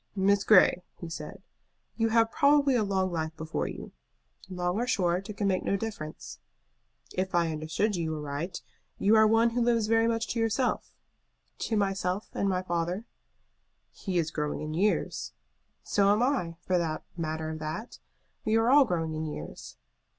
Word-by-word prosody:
"Miss 200 +1 +3
Grey," 185 -3 +6 0.2
he 170 - -7
said, 160 +4 -8 0.5
"you 225 -1 +1
have 225 0 +3
probably 285 -1 +4
a 235 -3 +2
long 190 -2 0
life 160 -1 -3
before 160 0 -3
you." - - -8 0.6
"Long 180 0 -1
or 245 - -1
short, 185 -2 0
it 205 - -7
can 205 - 0
make 185 -1 +1
no 200 - +1
difference." 195 -8 -6 0.7
"If 185 0 -2
I 170 -2 +2
understood 155 +7 -1
you 160 -2 -2
aright, 150 +4 -5 0.3
you 210 +3 +4
are 220 0 +6
one 225 +2 +4
who 240 +1 0
lives 235 -2 +2
very 225 +1 +3
much 230 0 0
to 235 - -2
yourself." 225 +3 0 0.7
"To 220 - -1
myself 195 -1 -1
and 200 - 0
my 185 -1 0
father." 175 +4 -2 0.9
"He 190 -3 -3
is 165 -2 0
growing 150 -1 -2
in 155 0 -4
years." 200 +6 0 0.5
"So 200 -1 +2
am 210 +3 +3
I, 245 -11 0
for 180 0 +1
the 155 -2 -2
matter 160 -1 -3
of 155 - -6
that. 155 +10 -6 0.4
We 220 - +1
are 225 +2 +3
all 285 0 +7
growing 165 -6 -1
in 155 0 -3
years." 80 - -8
190 Hz, 170 wpm, -28 LUFS, 165-225 Hz, 0.9 s, all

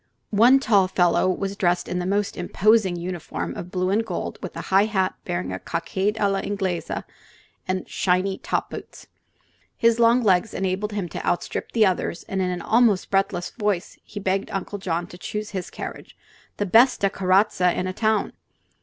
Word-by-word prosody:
One 235 +6 +7
tall 205 -8 +3
fellow 180 0 +2
was 195 +2 -2
dressed 180 -2 +1
in 180 0 -2
a 180 - -3
most 200 +1 0
imposing 195 +1 +2
uniform 170 - -4
of 175 - -7
blue 185 0 -1
and 215 +3 +2
gold, 185 -6 -5
with 185 - -7
a - - -3
high 195 +2 +6
hat 195 -4 0
bearing 90 +1 -3
a 95 - -4
cockade 190 - -2
a 205 - +3
la 195 -1 0
Inglese 195 -3 -2 0.8
and 185 0 -2
shiny 185 +1 0
top - - -2
boots. - - -9 0.7
His 230 0 +3
long 235 +1 +5
legs 195 +1 +2
enabled 195 +2 -2
him 200 -4 -2
to - - -6
outstrip 175 - -2
the 225 -2 +5
others, 180 -2 -1
and 190 -1 -3
in 185 - 0
an 180 -1 -4
almost 225 -4 +3
breathless 195 -3 0
voice 205 -6 -2
he 205 - -8
begged 195 0 -1
Uncle 195 +1 -4
John 175 -2 -2
to 175 0 -13
choose 210 +3 -5
his 185 -3 -4
carriage: - - -8 0.4
"the 205 - 0
besta 225 +1 +5
carrozza 185 -1 +2
ina 185 0 -2
town!" 220 +2 0
190 Hz, 180 wpm, -24 LUFS, 180-210 Hz, 0.8 s, One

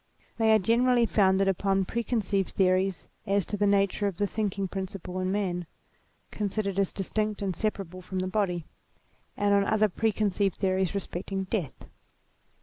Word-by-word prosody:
They 220 -1 +4
are 220 - +7
generally 235 +4 +3
founded 195 -3 +3
upon 195 0 +1
preconceived 210 -4 -1
theories 185 -3 +1 0.2
as 200 -2 +2
to - - -3
the 205 0 +2
nature 200 0 +2
of 190 -4 -4
the 205 - +1
thinking 200 -2 -2
principle 185 -1 -5
in 185 0 -1
man, 180 -4 -1 0.6
considered 200 -1 -2
as 195 - +2
distinct 210 +1 -2
and 190 -3 -1
separable 190 -3 -3
from 185 +1 -6
the 185 0 -1
body, 185 -4 -1 0.7
and 205 0 +2
on 200 0 +4
other 215 +1 +2
preconceived 205 -2 0
theories 190 -1 0
respecting 195 0 -3
death. 185 - -4
195 Hz, 150 wpm, -28 LUFS, 185-210 Hz, 0.7 s, are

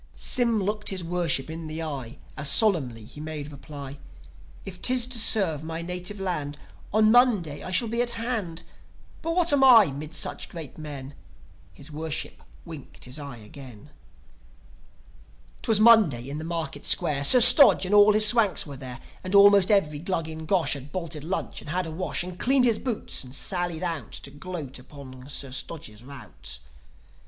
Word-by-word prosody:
Sym 235 -5 +1
looked 210 +2 -2
his 190 -2 -3
Worship 170 -5 -1
in 160 0 -7
the 155 +1 -6
eye, 140 -4 -6 0.2
As 150 -1 -1
solemnly 135 - +2
he 145 +6 -11
made 150 -1 -7
reply: 140 -1 -10 0.7
"If 180 -2 -9
'tis 255 -1 +3
to 250 -1 -2
serve 190 -9 +2
my 165 +1 -6
native 180 +3 -6
land, 150 -7 -4 0.3
On 215 +1 +3
Monday 215 - +2
I - - -7
shall 210 +6 +1
be 235 +2 -1
at 240 0 0
hand. 220 -8 -4 0.6
But 330 +1 -3
what 345 -4 +4
am 275 -1 +3
I 225 - +7
'mid 150 +4 -8
such - - -3
great 160 -5 -9
men?" 145 -3 -8 0.6
His 145 - -13
Worship 155 0 -5 0.2
winked 160 -6 -11
his 125 +4 -7
eye 140 -4 -9
again... 125 +4 -14 1.7
'Twas 220 -2 +1
Monday 210 - +4
in 150 - -5
the - - -7
Market 160 -4 -5
Square; 140 -2 +2
Sir 250 - +7
Stodge 245 -4 +8
and 190 - -3
all 205 0 +6
his 215 0 +7
Swanks 215 -4 +3
were 145 -3 -9
there. 130 -1 -9 0.2
And 185 +2 -3
almost 200 -1 +6
every 155 -8 +1
Glug 165 -1 -3
in 160 0 -8
Gosh 185 -3 +1
Had 140 0 -8
bolted 165 -4 -6
lunch 180 +5 -4
and - - -11
had 180 +3 -2
a 160 - -7
wash 175 +2 -2
And 180 0 -9
cleaned 260 0 +3
his 230 -3 +1
boots, 240 - -2
and 130 0 -10
sallied 175 0 -2
out 165 -4 -4
To 140 - -8
gloat 145 -3 -7
upon 130 -1 -13
Sir 140 -2 -6
Stodge's 130 -5 -6
rout. 70 - -9
165 Hz, 175 wpm, -25 LUFS, 145-205 Hz, 1.7 s, Stodge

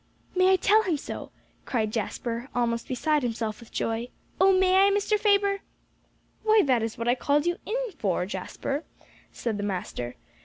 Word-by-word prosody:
"May 370 +1 +5
I - - +6
tell 420 +3 +4
him 355 -7 0
so?" - - -7 0.4
cried 220 -4 0
Jasper, 235 +3 -3
almost 235 -1 0
beside 295 +4 +1
himself 225 -3 -2
with 235 - -14
joy. 230 +1 -2 0.3
"Oh, 385 +1 +6
may 375 +1 +5
I, - - +5
Mr. 410 +1 +1
Faber?" 400 -1 +3 0.8
"Why, 435 -1 +5
that 255 -4 +3
is 225 0 -3
what 230 - -3
I 240 - +5
called 290 +4 +1
you 345 +1 +1
in 435 - -1
here 470 - -7
for, 180 -3 0
Jasper," 205 - -4 0.5
said 225 -3 -3
the 205 - -3
master. 180 -11 -4
260 Hz, 180 wpm, -27 LUFS, 225-380 Hz, 0.8 s, I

